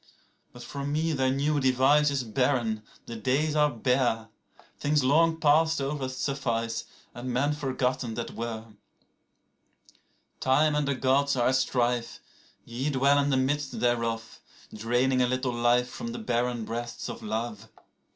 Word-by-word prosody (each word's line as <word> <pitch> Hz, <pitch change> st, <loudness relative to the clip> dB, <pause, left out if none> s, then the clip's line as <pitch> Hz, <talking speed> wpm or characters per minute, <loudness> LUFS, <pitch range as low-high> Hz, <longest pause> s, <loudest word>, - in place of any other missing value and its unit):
17But 120 Hz, -, -10 dB
for 140 Hz, -1 st, -6 dB
me 155 Hz, +3 st, 0 dB
their 130 Hz, -2 st, +1 dB
new 145 Hz, +3 st, +1 dB
device 135 Hz, +3 st, +4 dB
is 140 Hz, -2 st, -1 dB
barren, 120 Hz, -2 st, 0 dB, 0.2 s
the 115 Hz, -, -7 dB
days 135 Hz, +7 st, 0 dB
are 150 Hz, -1 st, +4 dB
bare;18Things 125 Hz, +3 st, -2 dB
long 160 Hz, +4 st, +3 dB
past 160 Hz, +1 st, +3 dB
over 135 Hz, -1 st, -2 dB
suffice, 125 Hz, -4 st, -2 dB, 0.3 s
and 125 Hz, +1 st, -5 dB
men 140 Hz, +4 st, +1 dB
forgotten 130 Hz, -4 st, -2 dB
that 120 Hz, 0 st, -4 dB
were.19Time 115 Hz, +5 st, -5 dB
and 150 Hz, -1 st, 0 dB
the 140 Hz, -, 0 dB
Gods 140 Hz, +2 st, +2 dB
are 120 Hz, -1 st, +2 dB
at 130 Hz, -, +2 dB
strife; 125 Hz, -2 st, 0 dB, 0.5 s
ye 125 Hz, +5 st, -3 dB
dwell 140 Hz, +1 st, +3 dB
in 140 Hz, 0 st, +1 dB
the 135 Hz, -, +2 dB
midst 140 Hz, +2 st, -1 dB
thereof,20Draining 120 Hz, +1 st, -1 dB
a -, -, +2 dB
little 130 Hz, 0 st, -1 dB
life 120 Hz, +1 st, +2 dB
from 235 Hz, -, -6 dB
the -, -, -5 dB
barren 120 Hz, -, -1 dB
breasts 120 Hz, +1 st, -5 dB
of -, -, -7 dB
love. 110 Hz, -1 st, -4 dB
130 Hz, 140 wpm, -27 LUFS, 120-145 Hz, 0.5 s, device